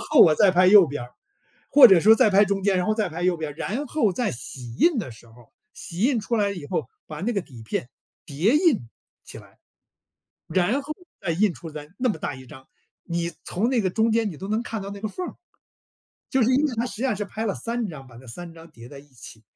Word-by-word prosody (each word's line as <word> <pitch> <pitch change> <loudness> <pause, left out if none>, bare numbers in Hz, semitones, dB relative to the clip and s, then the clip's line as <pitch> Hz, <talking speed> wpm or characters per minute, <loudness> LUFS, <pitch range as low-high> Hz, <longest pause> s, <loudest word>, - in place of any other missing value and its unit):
然 - - -9
后 295 -6 +6
我 155 -3 +6
再 200 +2 +4
拍 180 0 +4
右 195 -2 +8
边 145 -2 -5
儿， 125 - -16 0.6
或 275 -4 +9
者 190 -5 +6
说 220 +4 +7
再 215 - +4
拍 200 +1 +5
中 195 0 -2
间， 200 -1 +2
然 180 - 0
后 215 - +1
再 215 -4 0
拍 165 +2 -7
右 180 -2 +1
边。 155 -2 -5
然 250 - -4
后 235 -10 +1
在 240 +4 -1
洗 120 -1 -7
印 335 - +3
的 205 - -3
时 115 +1 -16
候， 120 0 -20 0.2
洗 175 0 -7
印 245 0 +2
出 230 +2 -2
来 205 -1 +1
以 175 -7 -7
后， 180 - -3 0.2
把 - - -8
那 235 +5 -1
个 200 - -1
底 120 -8 -13
片 120 +2 -4 0.4
叠 180 - +1
印 285 - +1 0.3
起 - - -10
来， - - -16 0.9
然 190 - +1
后 305 +2 -6 0.3
再 170 - -2
印 195 +3 +2
出 165 - -10
来 150 -1 -9
那 250 0 +1
么 210 - -1
大 140 - -4
一 130 -1 -13
张， 130 -2 -14 0.4
你 170 0 -3
从 215 +7 -1
那 255 -3 +1
个 185 -3 0
中 225 +3 +1
间 225 -2 +1
你 155 - -9
都 190 - -7
能 220 +2 -1
看 225 -3 -5
到 200 +1 -7
那 200 - -8
个 215 - -3
缝 365 - -5
儿， - - -9 1.0
就 265 -3 +2
是 245 - +2
因 290 +4 +3
为 270 - -2
它 230 +2 -1
实 245 - -7
际 245 - -4
上 255 -5 +1
是 205 - -3
拍 220 +2 -5
了 200 - -1
3 235 -1 -3
张， 145 -6 -9
把 120 -2 -15
这 130 - -15
3 170 +8 -8
张 165 0 -14
叠 120 -3 -13
在 140 -1 -11
一 145 - -18
起， 120 -4 -12
195 Hz, 275 characters per minute, -24 LUFS, 155-225 Hz, 1.0 s, 或